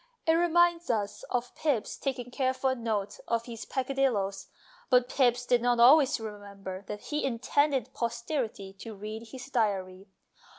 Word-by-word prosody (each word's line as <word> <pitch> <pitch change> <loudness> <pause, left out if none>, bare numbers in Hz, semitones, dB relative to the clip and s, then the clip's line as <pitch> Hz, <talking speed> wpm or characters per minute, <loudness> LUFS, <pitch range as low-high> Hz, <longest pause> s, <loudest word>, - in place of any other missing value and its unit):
It 320 - +4
reminds 345 0 +3
us 210 -4 -1
of 245 -1 -2
Pepys 275 -9 -1
taking 245 -3 -4
careful 260 0 0
note 220 -4 -2
of 230 0 0
his 230 -2 -7
peccadilloes, 250 -8 -1 0.4
but 250 -2 +4
Pepys 250 -2 +2
did 245 -1 +3
not 245 0 +2
always 265 +3 +6
remember 200 -3 -7
that 210 - -5
he 300 0 -3
intended 265 +1 +1
posterity 235 -5 -3
to 225 0 -8
read 215 +3 -7
his 250 +2 -9
diary. 195 -5 -1
240 Hz, 140 wpm, -29 LUFS, 215-265 Hz, 0.4 s, always